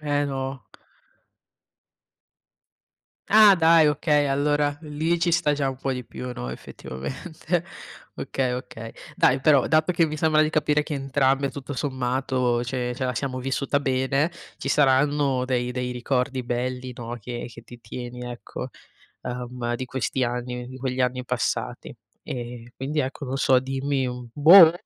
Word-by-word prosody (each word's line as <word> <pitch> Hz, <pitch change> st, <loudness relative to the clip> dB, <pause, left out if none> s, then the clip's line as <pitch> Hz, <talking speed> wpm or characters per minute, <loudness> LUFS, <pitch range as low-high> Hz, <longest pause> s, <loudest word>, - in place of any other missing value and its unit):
Eh, 145 Hz, -1 st, 0 dB
no. 135 Hz, -1 st, -4 dB, 2.6 s
Ah, 210 Hz, -1 st, +8 dB
dai, 165 Hz, -1 st, +6 dB
okay, 150 Hz, 0 st, +2 dB
allora 145 Hz, +1 st, +1 dB
lì 160 Hz, +3 st, -1 dB
ci 170 Hz, 0 st, +1 dB
sta 150 Hz, -3 st, +3 dB
già 140 Hz, -2 st, 0 dB
un 130 Hz, -, -7 dB
po' 135 Hz, 0 st, -1 dB
di 125 Hz, -1 st, -5 dB
più, 125 Hz, +2 st, -7 dB
no, 60 Hz, -, -5 dB
effettivamente. 155 Hz, -, -5 dB, 0.5 s
Okay, 130 Hz, -2 st, -1 dB
okay. 115 Hz, -2 st, -6 dB, 0.2 s
Dai 130 Hz, +1 st, +4 dB
però, 140 Hz, -2 st, +4 dB
dato 155 Hz, +3 st, +3 dB
che 170 Hz, -1 st, +3 dB
mi 155 Hz, 0 st, -5 dB
sembra 155 Hz, 0 st, +4 dB
di 155 Hz, -, +1 dB
capire 150 Hz, -1 st, +2 dB
che 150 Hz, -, -7 dB
entrambe, 135 Hz, 0 st, +1 dB
tutto 140 Hz, 0 st, -7 dB
sommato, 130 Hz, -2 st, 0 dB
ce 125 Hz, 0 st, -2 dB
ce 130 Hz, -, -6 dB
la 125 Hz, -, -2 dB
siamo 130 Hz, +2 st, -3 dB
vissuta 135 Hz, +2 st, 0 dB
bene, 135 Hz, +3 st, +1 dB, 0.3 s
ci 135 Hz, -, -4 dB
saranno 140 Hz, -1 st, +3 dB
dei 125 Hz, -1 st, -1 dB
dei 125 Hz, 0 st, -2 dB
ricordi 125 Hz, +1 st, -1 dB
belli, 125 Hz, +1 st, -3 dB
no, 120 Hz, 0 st, -6 dB
che 120 Hz, +2 st, -6 dB
che 120 Hz, -, -12 dB
ti 120 Hz, -1 st, -13 dB
tieni 125 Hz, +2 st, -7 dB
ecco, 120 Hz, -, -7 dB, 0.6 s
ehm, 125 Hz, -1 st, -3 dB
di 130 Hz, -, -4 dB
questi 130 Hz, +1 st, -2 dB
anni 125 Hz, 0 st, -3 dB
di 130 Hz, -, -9 dB
quegli 130 Hz, 0 st, -2 dB
anni 125 Hz, 0 st, -1 dB
passati. -, -, -2 dB, 0.3 s
E 120 Hz, -1 st, -6 dB
quindi 145 Hz, +3 st, -2 dB
ecco, 130 Hz, +2 st, -4 dB
non 135 Hz, +1 st, -3 dB
so, 130 Hz, -1 st, +4 dB
dimmi, 135 Hz, 0 st, -1 dB
mhmm, 125 Hz, -1 st, -6 dB
boh, 165 Hz, +4 st, +9 dB
130 Hz, 155 wpm, -25 LUFS, 125-145 Hz, 2.6 s, boh